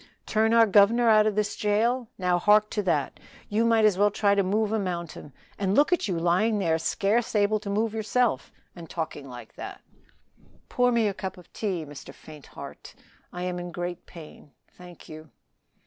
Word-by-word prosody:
"Turn 220 +1 +1
our 230 0 +6
governor 220 +3 +4
out 215 -1 +5
of 210 - -1
this 210 -1 -1
jail? 225 +4 0
Now 180 -2 +1
hark 210 +2 +3
to 210 - -1
that. 160 -8 -1 0.3
You 215 +2 +1
might 225 -1 +3
as 200 -3 +2
well 205 +1 +5
try 200 0 +1
to 200 - +2
move 205 +3 0
a 220 - 0
mountain; 170 -6 -5 0.3
and 195 0 0
look 295 +5 +4
at 355 - 0
you 180 -4 -2
lying 180 +6 +1
there 165 -5 0
scarce 215 +7 0
able 210 +1 +2
to 205 -1 -7
move 215 +2 -1
yourself, 220 - 0 0.2
and 170 -3 -11
talking 150 -4 -5
like 120 -1 -11
that." - - -8 0.9
"Pour 245 0 +2
me 235 -2 +2
out - - 0
a - - -9
cup 190 -1 -6
of 180 - -17
tea, 185 -7 -3
Mr. 140 -1 -11
Faintheart; 155 -2 -12 0.4
I 180 - -6
am 180 -1 -3
in 175 0 -7
great 175 0 -6
pain 155 -3 -13 0.2
thank 180 -2 -14
you." 155 0 -11
200 Hz, 195 wpm, -26 LUFS, 175-220 Hz, 0.9 s, our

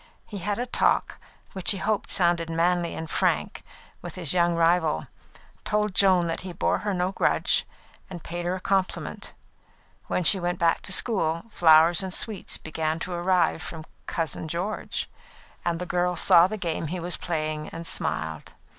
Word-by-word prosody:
He 205 - -7
had 205 +3 -2
a 245 - -2
talk, 250 - +1 0.3
which 190 -2 -2
he 200 - +4
hoped 210 +2 -1
sounded 170 -2 +2
manly 170 +1 +1
and 160 - -5
frank, - - 0 0.4
with - - -7
his 175 -4 -1
young 175 -1 +2
rival, 165 - +2 0.6
told 210 -1 0
Joan 185 -3 +4
that 165 - -3
he 185 0 -7
bore 170 - 0
her 210 - -2
no 180 0 0
grudge, - - +2 0.4
and 175 -3 -8
paid 175 +1 -4
her 180 - 0
a - - -5
compliment. 190 0 -2 0.7
When 180 - 0
she 190 +3 +5
went 175 0 -2
back 165 -1 +2
to - - -4
school, 170 -6 +2
flowers 165 -1 +6
and 190 -1 -4
sweets 210 +1 -2
began 155 0 -2
to 180 +2 -5
arrive 175 -1 +1
from 160 -2 -7 0.2
"Cousin 160 -1 -3
George"; 180 +7 -3 0.6
and 170 -1 -1
the 180 - -4
girl 180 0 0
saw 170 +1 +6
the 215 +3 -5
game 165 -5 -2
he 180 +4 -4
was 175 +1 -2
playing 155 -2 -3
and 165 +1 -8
smiled. 80 - -3
175 Hz, 175 wpm, -26 LUFS, 165-185 Hz, 0.7 s, flowers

